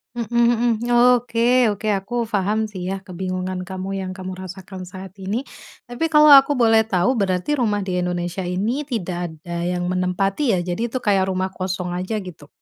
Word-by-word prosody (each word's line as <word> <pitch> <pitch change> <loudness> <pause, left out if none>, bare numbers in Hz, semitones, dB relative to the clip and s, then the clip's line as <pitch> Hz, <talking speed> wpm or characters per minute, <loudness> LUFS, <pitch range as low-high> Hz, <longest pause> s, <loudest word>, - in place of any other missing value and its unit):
Mhm 235 0 0 0.4
mhm. 240 - -3 0.3
Oke 240 +1 +2
oke, 215 +2 -6
aku 195 +3 -3 0.2
paham 205 +2 +1
sih 185 -3 -7
ya 195 - -1
kebingungan 185 0 -4
kamu 190 +1 -5
yang 185 -1 -4
kamu 185 0 -6
rasakan 190 0 -9
saat 190 0 -9
ini. 205 +7 -2 0.4
Tapi 245 +6 -2
kalau 300 0 +7
aku 280 +1 +8
boleh 225 -3 +5
tahu 185 +3 +2
berarti 185 +4 -1
rumah 210 -4 +1
di 180 -1 -2
Indonesia 180 +1 -2
ini 225 +11 -2
tidak 175 - -3
ada 170 0 -3
yang 180 0 -1
menempati 195 +7 0
ya? 180 - 0
Jadi 180 +5 -3
itu 245 - -3
kayak 195 -2 +2
rumah 185 0 -1
kosong 185 -1 -3
aja 185 +5 -3
gitu? 170 -5 -11
190 Hz, 175 wpm, -21 LUFS, 180-225 Hz, 0.4 s, aku